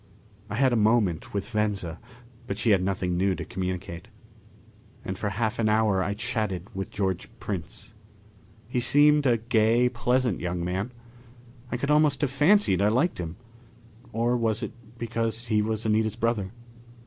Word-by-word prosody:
I 105 Hz, -, -3 dB
had 130 Hz, +1 st, +3 dB
a -, -, +3 dB
moment 105 Hz, -6 st, +2 dB
with 100 Hz, +4 st, -4 dB
Venza, 100 Hz, -6 st, -1 dB, 0.5 s
but 100 Hz, -, -3 dB
she 110 Hz, +1 st, +2 dB
had 95 Hz, -2 st, +4 dB
nothing 95 Hz, -1 st, -1 dB
new 95 Hz, +1 st, +2 dB
to -, -, -6 dB
communicate. 90 Hz, -2 st, -5 dB, 1.0 s
And 95 Hz, -, -3 dB
for 100 Hz, +2 st, -2 dB
half 110 Hz, +3 st, -2 dB
an 110 Hz, -1 st, +2 dB
hour 105 Hz, -3 st, +2 dB
I 100 Hz, +2 st, -2 dB
chatted 105 Hz, -5 st, -2 dB
with 95 Hz, 0 st, -4 dB
George 95 Hz, -3 st, -2 dB
Prince. 95 Hz, +2 st, -6 dB, 0.7 s
He 125 Hz, +1 st, -1 dB
seemed 145 Hz, +3 st, +5 dB
a 120 Hz, -2 st, +4 dB
gay, 115 Hz, +2 st, +3 dB
pleasant 125 Hz, -3 st, 0 dB
young 90 Hz, 0 st, -3 dB
man. 95 Hz, +7 st, -2 dB, 0.8 s
I 125 Hz, -, -1 dB
could 140 Hz, +4 st, -1 dB
almost 150 Hz, -2 st, +3 dB
have 145 Hz, -3 st, +1 dB
fancied 150 Hz, -, +4 dB
I 100 Hz, -, +4 dB
liked 130 Hz, -, +1 dB
him. 85 Hz, -1 st, -4 dB, 0.8 s
Or 120 Hz, +2 st, +1 dB
was 115 Hz, -1 st, 0 dB
it -, -, -4 dB, 0.3 s
because 115 Hz, 0 st, -2 dB
he 105 Hz, -2 st, +3 dB
was 110 Hz, +1 st, -2 dB
Anita's 110 Hz, 0 st, +1 dB
brother? 115 Hz, -4 st, -1 dB
110 Hz, 160 wpm, -26 LUFS, 95-120 Hz, 1.0 s, seemed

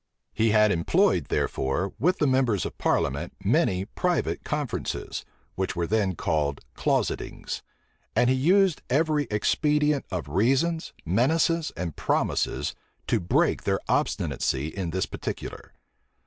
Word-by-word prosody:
He 110 Hz, +1 st, +2 dB
had 105 Hz, 0 st, +5 dB
employed, 85 Hz, -3 st, +2 dB
therefore, 75 Hz, +9 st, -1 dB
with 180 Hz, -, +2 dB
the 150 Hz, -, +2 dB
members 130 Hz, -7 st, +2 dB
of -, -, -5 dB
parliament -, -, 0 dB
many 95 Hz, 0 st, +2 dB
private 175 Hz, -, -1 dB
conferences, 150 Hz, -6 st, -3 dB, 0.3 s
which 95 Hz, 0 st, -2 dB
were 85 Hz, -1 st, 0 dB
then 100 Hz, -1 st, +1 dB
called 75 Hz, -3 st, 0 dB, 0.2 s
"closetings;" -, -, -1 dB, 0.5 s
and 120 Hz, +2 st, +4 dB
he 130 Hz, -, +4 dB
used 180 Hz, +5 st, +3 dB
every 150 Hz, +1 st, +2 dB
expedient 150 Hz, +7 st, +1 dB
of 90 Hz, -6 st, -3 dB
reasons, 135 Hz, -, +1 dB
menaces, 155 Hz, -, +2 dB
and 85 Hz, -3 st, -3 dB
promises -, -, 0 dB, 0.3 s
to -, -, +1 dB
break 85 Hz, -, +1 dB
their -, -, +1 dB
obstinacy 70 Hz, +3 st, 0 dB
in 90 Hz, -1 st, -4 dB
this 95 Hz, +3 st, -1 dB
particular. -, -, -6 dB
115 Hz, 125 wpm, -26 LUFS, 90-150 Hz, 0.5 s, had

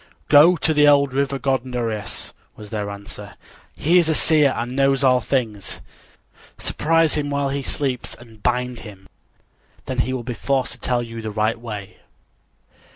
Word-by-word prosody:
"Go 150 Hz, +5 st, +7 dB
to 160 Hz, -1 st, 0 dB
the 150 Hz, -1 st, +5 dB
old 140 Hz, -2 st, +4 dB
river 140 Hz, 0 st, 0 dB
god 130 Hz, -1 st, 0 dB
Nereus," 115 Hz, -6 st, -4 dB, 0.2 s
was 105 Hz, -1 st, -11 dB
their 105 Hz, -2 st, -3 dB
answer. 100 Hz, 0 st, -9 dB, 0.4 s
"He 175 Hz, +4 st, +4 dB
is 165 Hz, -2 st, +2 dB
a 160 Hz, -, +2 dB
seer 150 Hz, -4 st, +4 dB
and 120 Hz, +2 st, -3 dB
knows 135 Hz, 0 st, +2 dB
all 125 Hz, -1 st, +5 dB
things. 110 Hz, -4 st, -2 dB, 0.8 s
Surprise 165 Hz, 0 st, +2 dB
him 145 Hz, -1 st, 0 dB
while 140 Hz, -1 st, 0 dB
he 140 Hz, +1 st, -2 dB
sleeps 135 Hz, -2 st, -2 dB
and 115 Hz, -3 st, -16 dB
bind 125 Hz, 0 st, -1 dB
him; 95 Hz, -3 st, -12 dB, 0.8 s
then 130 Hz, -1 st, -3 dB
he 130 Hz, -, +1 dB
will 130 Hz, -2 st, -3 dB
be 125 Hz, +1 st, -4 dB
forced 130 Hz, 0 st, -1 dB
to -, -, -7 dB
tell 125 Hz, -1 st, 0 dB
you 115 Hz, -1 st, -7 dB
the 110 Hz, -, -4 dB
right 110 Hz, +2 st, 0 dB
way." 105 Hz, -4 st, -8 dB
125 Hz, 170 wpm, -21 LUFS, 115-140 Hz, 0.8 s, Go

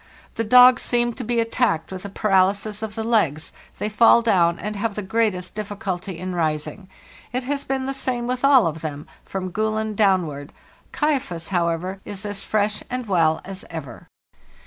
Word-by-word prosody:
The 225 Hz, -, -2 dB
dogs 250 Hz, +3 st, +7 dB
seem 240 Hz, -1 st, +1 dB
to 250 Hz, -, -6 dB
be 235 Hz, +1 st, 0 dB
attacked 230 Hz, -7 st, 0 dB
with 185 Hz, -1 st, -7 dB
a -, -, -5 dB
paralysis 200 Hz, +1 st, +1 dB
of 215 Hz, -1 st, -5 dB
the 225 Hz, -, -3 dB
legs; 185 Hz, -10 st, 0 dB, 0.2 s
they 210 Hz, -, -2 dB
fall 230 Hz, +2 st, +5 dB
down, 170 Hz, -6 st, +3 dB
and 210 Hz, +3 st, -5 dB
have 205 Hz, +1 st, -2 dB
the 210 Hz, -, -4 dB
greatest 190 Hz, -3 st, -1 dB
difficulty 200 Hz, -3 st, -5 dB
in 185 Hz, +1 st, -5 dB
rising. 165 Hz, +3 st, -2 dB, 0.4 s
It 250 Hz, +1 st, -2 dB
has 280 Hz, +2 st, -2 dB
been 265 Hz, 0 st, -2 dB
the 270 Hz, -, -2 dB
same 255 Hz, -3 st, -2 dB
with 250 Hz, +1 st, -3 dB
all 275 Hz, -3 st, +6 dB
of 160 Hz, -1 st, -2 dB
them, 150 Hz, -1 st, -5 dB, 0.2 s
from 185 Hz, -1 st, -4 dB
' -, -, -21 dB
Gulen' 215 Hz, 0 st, -1 dB
downward. 175 Hz, -9 st, +1 dB, 0.2 s
' -, -, -32 dB
Kaifas,' 260 Hz, -, -1 dB
however, 175 Hz, +1 st, -1 dB
is 200 Hz, 0 st, -8 dB
as 205 Hz, -1 st, -3 dB
fresh 210 Hz, 0 st, 0 dB
and 250 Hz, 0 st, -3 dB
well 165 Hz, -5 st, +2 dB
as 195 Hz, 0 st, -8 dB
ever. 140 Hz, -8 st, -8 dB
205 Hz, 185 wpm, -22 LUFS, 180-230 Hz, 0.4 s, dogs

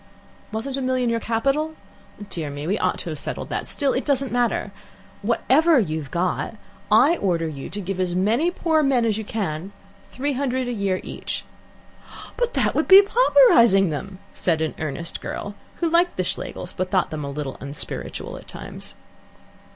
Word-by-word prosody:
"Wasn't 255 Hz, +5 st, -3 dB
a -, -, -2 dB
million 255 Hz, -2 st, +1 dB
your 230 Hz, -, +1 dB
capital? 275 Hz, +8 st, 0 dB, 0.6 s
Dear 160 Hz, -4 st, -3 dB
me! 145 Hz, +1 st, -6 dB
we 195 Hz, +6 st, 0 dB
ought -, -, +1 dB
to -, -, -6 dB
have -, -, -6 dB
settled -, -, -5 dB
that. -, -, -3 dB
Still, 280 Hz, -3 st, +1 dB
it 255 Hz, -, -1 dB
doesn't 275 Hz, -2 st, 0 dB
matter. 240 Hz, -4 st, 0 dB, 0.5 s
Whatever 270 Hz, +8 st, +4 dB
you've 155 Hz, -, -2 dB
got, 180 Hz, +6 st, -1 dB, 0.4 s
I 280 Hz, +11 st, +6 dB
order 170 Hz, -4 st, 0 dB
you 140 Hz, -3 st, -6 dB
to 205 Hz, -, -5 dB
give 195 Hz, -1 st, -4 dB
as 180 Hz, -1 st, 0 dB
many 225 Hz, -, +2 dB
poor 325 Hz, -3 st, +1 dB
men 265 Hz, -5 st, +2 dB
as 220 Hz, -1 st, +1 dB
you -, -, -4 dB
can 195 Hz, -3 st, -4 dB, 0.4 s
three 285 Hz, +3 st, -2 dB
hundred 260 Hz, -1 st, -1 dB
a 245 Hz, -, -2 dB
year 200 Hz, -4 st, -1 dB
each. -, -, -5 dB, 0.5 s
" -, -, -15 dB
"But 485 Hz, -1 st, -1 dB
that -, -, +2 dB
would -, -, +1 dB
be 390 Hz, +1 st, +10 dB
pauperizing 240 Hz, -, +5 dB
them," 190 Hz, +6 st, -5 dB, 0.2 s
said 165 Hz, -3 st, 0 dB
an 160 Hz, -1 st, -1 dB
earnest 155 Hz, +2 st, -4 dB
girl, 205 Hz, -, -5 dB, 0.2 s
who 340 Hz, -, 0 dB
liked 345 Hz, +2 st, +2 dB
the 185 Hz, -, +1 dB
Schlegels, 180 Hz, 0 st, -5 dB
but 185 Hz, 0 st, -2 dB
thought 185 Hz, -1 st, +1 dB
them 155 Hz, -1 st, -4 dB
a 140 Hz, -, -4 dB
little 140 Hz, -1 st, -5 dB
unspiritual 140 Hz, +2 st, -6 dB
at -, -, -13 dB
times. -, -, -8 dB
220 Hz, 180 wpm, -23 LUFS, 175-275 Hz, 0.6 s, be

